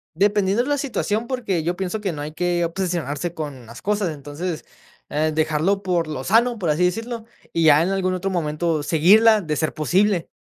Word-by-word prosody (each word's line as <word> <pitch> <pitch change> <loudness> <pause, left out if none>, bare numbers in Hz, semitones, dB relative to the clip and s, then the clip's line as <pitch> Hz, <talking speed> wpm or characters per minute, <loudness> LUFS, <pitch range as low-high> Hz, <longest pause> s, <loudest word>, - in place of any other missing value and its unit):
Dependiendo 205 +4 +2
la 290 +1 0
situación, 235 -5 -1
porque 235 -10 -2
yo 175 +3 -2
pienso 190 +3 -3
que 195 -4 -2
no 145 -2 -6
hay 150 +1 -6
que 175 +1 0
obsesionarse 170 -2 -2
con 145 -7 -6
las 115 +2 -12
cosas, 205 -3 0
entonces, 150 +4 -5 0.5
eh, 155 +1 +1
dejarlo 160 +5 +1
por 175 -4 0
lo 135 -4 -5
sano, 235 - +3
por 175 -6 -1
así 155 +4 +2
decirlo, 225 +5 -2 0.3
y 165 - +1
ya 155 0 +6
en 175 - 0
algún 185 -1 0
otro 190 +1 -2
momento 160 -2 -1
seguirla 210 +9 +5
de 155 -5 -3
ser 155 - -1
posible. 180 +3 +1
175 Hz, 190 wpm, -22 LUFS, 155-205 Hz, 0.5 s, ya